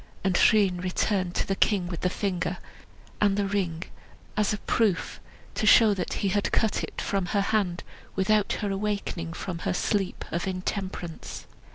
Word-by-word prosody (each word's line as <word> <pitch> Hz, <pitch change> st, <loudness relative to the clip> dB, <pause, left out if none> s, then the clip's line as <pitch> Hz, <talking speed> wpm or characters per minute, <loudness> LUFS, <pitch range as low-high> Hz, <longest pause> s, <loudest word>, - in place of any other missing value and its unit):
And 190 Hz, -1 st, +2 dB
Rhun 190 Hz, -3 st, +4 dB
returned 185 Hz, 0 st, 0 dB
to -, -, +1 dB
the 195 Hz, -, 0 dB
king 195 Hz, -2 st, +2 dB
with 175 Hz, -2 st, -5 dB
the 180 Hz, -, +2 dB
finger 185 Hz, -2 st, -2 dB, 0.6 s
and 200 Hz, -1 st, +3 dB
the 205 Hz, -, +1 dB
ring 185 Hz, -4 st, -1 dB, 0.5 s
as 210 Hz, -1 st, +2 dB
a 210 Hz, -, -1 dB
proof, 205 Hz, -2 st, 0 dB, 0.3 s
to 215 Hz, -, -1 dB
show 215 Hz, -1 st, +7 dB
that 185 Hz, -3 st, -3 dB
he -, -, +3 dB
had 205 Hz, +1 st, 0 dB
cut 220 Hz, -2 st, +2 dB
it -, -, -6 dB
off -, -, -3 dB
from 195 Hz, -3 st, 0 dB
her 200 Hz, +1 st, +1 dB
hand 185 Hz, -5 st, +1 dB, 0.3 s
without 205 Hz, +2 st, +2 dB
her 205 Hz, -2 st, -1 dB
awaking 195 Hz, -4 st, -2 dB
from 175 Hz, -1 st, -5 dB
her 180 Hz, -, -1 dB
sleep 195 Hz, 0 st, -1 dB
of 170 Hz, +3 st, -2 dB
intemperance. 185 Hz, -2 st, -4 dB
195 Hz, 175 wpm, -27 LUFS, 180-205 Hz, 0.6 s, show